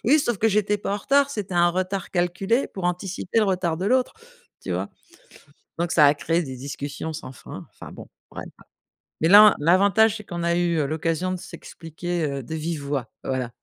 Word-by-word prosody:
oui, 280 +7 +5
sauf 240 -6 0
que 225 - +3
j'étais 210 0 +1
pas 200 - -3
en - - -1
retard. 280 +6 +2
C'était 200 -7 -5
un 175 0 +4
retard 185 +2 -3
calculé 190 +8 0
pour 190 - -8
anticiper 180 +3 -2
le 220 - +4
retard 180 -4 0
de 185 +4 -3
l'autre. 255 +3 +1 0.5
Tu - - -5
vois? - - -3 0.9
Donc, 170 0 -1
ça 150 -3 +6
a 145 - +5
créé 165 +3 0
des 130 -4 -7
discussions 145 +4 -6
sans 155 -3 -8
fin, 130 - -11
enfin, - - -12
bon, - - -11 0.2
bref. - - -8 0.8
Mais 160 - +3
là, 210 +2 +9
l'avantage, 200 +7 +3
c'est 215 - -10
qu'on 175 -2 -5
a 170 0 +1
eu, 175 -1 +1
heu, 150 - +1
l'occasion 165 +4 -2
de 185 - -2
s'expliquer, 170 +1 -6
heu, 140 -1 -4
de 160 - -6
vive 160 -1 -4
voix, 140 -5 -3
voilà. 130 -2 -3
175 Hz, 205 wpm, -23 LUFS, 160-200 Hz, 0.9 s, là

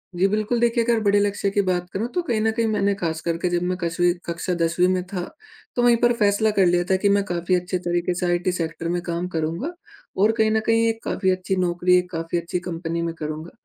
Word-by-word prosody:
जी। 190 +3 +3
बिल्कुल, 215 +3 0
देखिए 235 0 +2
अगर 230 -1 +2
बड़े 205 0 +4
लक्ष्य 200 0 0
की 200 +1 +1
बात 180 -1 0
करूँ 215 +5 -2
तो 355 - +2
कहीं 235 -10 -1
न 220 0 +2
कहीं 230 0 0
मैंने 200 -2 +1
खास 160 -1 -2
कर 165 0 -1
के 180 - +2
जब 175 0 0
मैं 180 0 -1
कछवीं 175 +1 +1
कक्षा 170 +1 -3
10वीं 170 +2 +2
में 185 -1 +1
था, 185 -2 -4 0.5
तो 245 - +1
वहीं 240 -1 +6
पर 240 0 +3
फ़ेेसला 215 -1 +2
कर 190 - +5
लिया 175 0 +3
था 190 - +4
कि 200 - +4
मैं 200 0 +3
काफ़ी 175 0 0
अच्छे 180 +1 -1
तरीके 175 +1 0
से 180 +1 -2
आईटी 175 +1 +1
सेक्टर 165 -1 -3
में 175 - -1
काम 170 +1 -3
करूँगा 165 - -2 0.5
और 215 +2 +5
कहीं 220 0 +3
न 220 - +3
कहीं 225 0 +3
एक 225 0 -4
काफ़ी 190 -1 0
अच्छी 185 +1 -1
नौकरी 180 0 +2
एक 180 0 -1
काफ़ी 165 +1 -2
अच्छी 170 +1 -3
कंपनी 170 -1 -4
में 165 -1 -2
करूँगा। 155 +2 -6
180 Hz, 245 wpm, -23 LUFS, 175-210 Hz, 0.5 s, वहीं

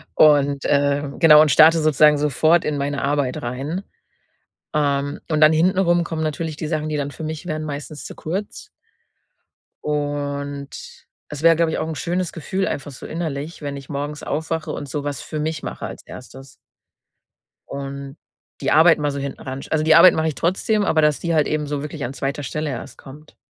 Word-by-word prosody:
Und, 145 -2 +4
ähm 140 0 +1
genau 150 -2 +8
und 155 - +4
starte 160 +3 +7
sozusagen 150 -1 +4
sofort 155 +4 +2
in 150 -1 -1
meine 140 0 -2
Arbeit 140 -2 -1
rein. 135 +10 -4 0.9
Ähm, 145 -1 0
und 155 -1 +1
dann 155 +1 +7
hinten 180 +4 +2
rum 175 -2 +3
kommen 160 -1 -4
natürlich 155 0 -3
die 155 - -4
Sachen, 155 -1 -2
die 155 - -2
dann 145 -1 -2
für 150 - -10
mich 155 +1 -5
wären, 155 -1 -3
meistens 150 0 -7
zu - - -9
kurz. 200 - -5 1.1
Und 145 -1 -3 0.6
es 150 -1 -7
wäre, 165 0 +6
glaube 165 0 +1
ich, - - -2
auch 160 - -2
'n 160 - -4
schönes 175 +4 -2
Gefühl 190 +4 -2
einfach 145 +1 -4
so 130 - -11
innerlich, 160 -1 -5
wenn 140 -1 -4
ich 135 -1 -11
morgens 145 +1 -5
aufwache 160 0 -3
und 145 - -6
so 145 +1 -3
was 145 -1 -4
für 155 - -6
mich 155 0 -3
mache - - -5
als - - -8
1.. 135 +1 -12 1.1
Und 140 +1 -7 0.4
die - - 0
Arbeit 165 +1 +6
mal 145 -1 -1
so 140 - -4
hinten 140 -1 -6
ranst 135 +1 -7
also 155 -1 +1
die 160 0 +6
Arbeit 170 +1 +8
mache 160 0 0
ich 150 - -5
trotzdem, 200 +5 0
aber 160 -5 +2
dass 150 -1 +2
die 170 -1 -1
halt 155 -2 +3
eben 155 -1 -1
so 145 -1 -3
wirklich 150 0 -6
an 120 - -4
2. 140 +1 -3
Stelle 150 +2 -3
erst 120 - -7
kommt. 150 +3 -14
150 Hz, 195 wpm, -21 LUFS, 140-160 Hz, 1.1 s, genau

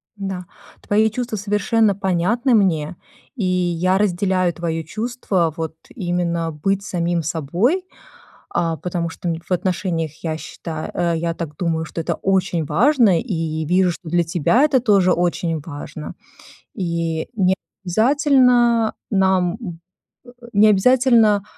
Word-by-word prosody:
Да, 190 -3 -5 0.4
твои 215 +2 +2
чувства 240 -1 -3
совершенно 210 +1 +1
понятны 200 +7 +1
мне, 175 -5 +1 0.4
и 225 - -3
я 180 0 +1
разделяю 185 -2 +1
твоё 165 -1 -3
чувство, 195 -4 -1
вот, 160 -2 -4 0.2
именно 175 -4 -1
быть 195 +6 -1
самим 175 -3 -1
собой, 175 - 0 0.7
а, 165 -2 0
потому 170 +1 -3
что, 170 +2 -6
м, 165 - 0
н 165 - -7
в - - -26
отношениях, 175 -4 -1
я 160 -2 -2
считаю, 160 -1 -7
э, 170 -1 0
я 165 0 -2
так 150 -3 -6
думаю, 165 -2 -1
что 165 - -6
это 160 - -1
очень 185 -4 0
важно 215 - +3
и 160 -7 -3
вижу, 180 +2 +3
что 170 0 -8
для 175 +1 +2
тебя 175 - +2
это 270 -4 +3
тоже 200 -6 +3
очень 170 -2 -1
важно. 145 0 -8 0.6
И 170 -3 -2
не 190 -3 +2 0.3
обязательно 240 - +3 0.2
нам, 190 -2 +2
м, 175 -7 -7 0.4
э, 245 - -14 0.2
не 215 +1 +5
обязательно, 225 -1 +4
180 Hz, 140 wpm, -20 LUFS, 165-210 Hz, 0.7 s, не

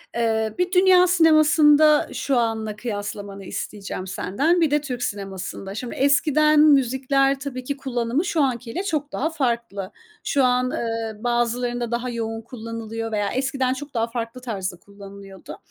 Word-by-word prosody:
Eee, 220 -2 0
bir 360 0 0
dünya 365 -1 +5
sinemasında 310 -3 +5
şu 270 -3 0
anla 220 -2 -1
kıyaslamanı 205 -3 -6
isteyeceğim 195 -2 -6
senden, 285 - 0
bir 310 -3 +2
de 295 0 +2
Türk 250 -4 -4
sinemasında. 195 0 -5
Şimdi 240 +1 -5
eskiden 300 +2 +3
müzikler, 275 -1 +3
tabii 260 -3 -6
ki, 280 +2 -4
kullanımı 260 +4 -1
şu 325 -3 0
anki 240 -3 -2
ile 370 - -3
çok 300 -6 -2
daha 315 +4 -1
farklı. 235 - -2 0.3
Şu 275 -2 +1
an, 250 0 +2
eee, 225 -1 -4
bazılarında 240 0 -1
daha 240 +1 -2
yoğun 225 -1 -4
kullanılıyor 225 -1 -6
veya 205 -1 0
eskiden 265 0 0
çok 285 +2 -8
daha 230 0 0
farklı 235 +1 -5
tarzda 190 -7 -4
kullanılıyordu. 200 -1 -12
245 Hz, 150 wpm, -23 LUFS, 220-285 Hz, 0.3 s, dünya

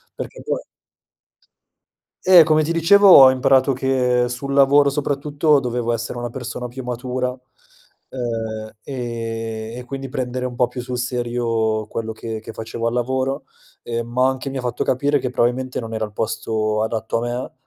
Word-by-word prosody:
perché - - -7
po - - -2 1.6
Eh, 180 -3 +8
come 155 0 +3
ti 155 - -3
dicevo 190 +5 +5
ho 135 -8 +10
imparato 130 +1 +3
che 125 -2 +1
sul 125 +3 -5
lavoro 140 +1 +5
soprattutto, 145 +1 +1
dovevo 120 -2 -2
essere 115 +1 -4
una 120 0 -4
persona 125 0 -6
più 130 +2 -8
matura, 125 +1 -3 0.7
ehm, 115 -3 -4
e 115 -3 -5
e 125 - -7
quindi 135 +1 -6
prendere 125 0 -3
un 125 - -6
po' 120 0 +2
più 125 +1 -6
sul 125 0 -4
serio 120 -3 -1
quello 110 0 -4
che 110 0 -6
che 110 +1 -9
facevo 115 +1 -5
al 115 - 0
lavoro, 130 +2 -1 0.4
ehm, 115 0 -3
ma 125 +2 +2
anche 135 +1 -3
mi 135 - -4
ha - - -2
fatto 125 -1 -2
capire 145 +3 +1
che 125 -1 -3
probabilmente 125 +1 0
non 115 -1 -6
era 110 0 -1
il 105 - -8
posto 110 -1 -1
adatto 110 0 -2
a - - -2
me. 120 +1 -4
125 Hz, 170 wpm, -21 LUFS, 115-135 Hz, 1.6 s, ho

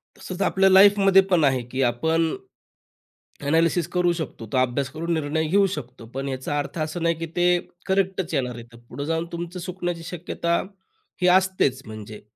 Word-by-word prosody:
तसंच 185 +1 -7
आपल्या 195 0 +3
लाईफ 200 +2 +7
मध्ये 195 -1 +6
पण 175 -4 +4
आहे 130 -3 +3
की 130 - -1
आपण 160 +7 +1 1.2
एनालिसिस 165 +2 +2
करू 180 -1 +2
शकतो. 160 -8 -6
तो - - +2
अभ्यास 130 +2 +1
करून 165 +4 -3
निर्णय 160 0 -1
घेऊ 200 +5 +4
शकतो. 125 -4 -9
पण 135 +1 -3
याचा 130 +2 -3
अर्थ 145 +3 -5
असा 155 +3 -3
नाही 170 0 +1
की 165 - -3
ते 175 0 +3 0.3
करेक्टच 190 -2 0
येणार 125 -4 -1
आहे. 115 0 -12
पुढे 120 +4 -8
जाऊन 165 +1 -1
तुमचं 170 +1 -5
चुकण्याची 175 -1 -4
शक्यता 170 0 -2 0.6
ही 180 - +4
असतेच 185 -9 0
म्हणजे. 110 -1 -9
165 Hz, 170 wpm, -24 LUFS, 135-180 Hz, 1.2 s, लाईफ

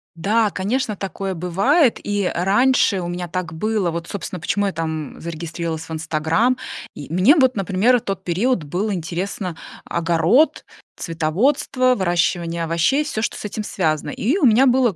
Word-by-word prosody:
Да, 210 +5 +2
конечно, 215 +4 -1
такое 195 0 -4
бывает. 200 - +2
И 205 -2 0
раньше 200 +2 +3
у 175 - -4
меня 175 0 -4
так 175 -2 -4
было. 210 0 0
Вот, 170 0 -5
собственно, 185 -3 -5
почему 205 +5 0
я 195 - 0
там 160 -2 -4
зарегистрировалась 165 0 -4
в - - -11
"Инстаграм". 160 +10 +1 0.4
И 145 +1 -9
мне 190 - +5
вот, 260 -6 +3
например, 195 +6 +2
в - - -18
тот 195 -2 -4
период 190 +3 0
было 190 +8 -2
интересно: 180 +1 -4 0.3
огород, 170 - +2 0.3
цветоводство, 250 - +1
выращивание 175 -2 0
овощей- 170 - +1
всё, 255 -8 -3
что - - -2
с - - -7
этим 210 +1 -4
связано. 155 -7 -1
И 255 - 0
у 310 - +2
меня 245 +3 +5
была 250 -5 +3
190 Hz, 160 wpm, -21 LUFS, 165-225 Hz, 0.4 s, мне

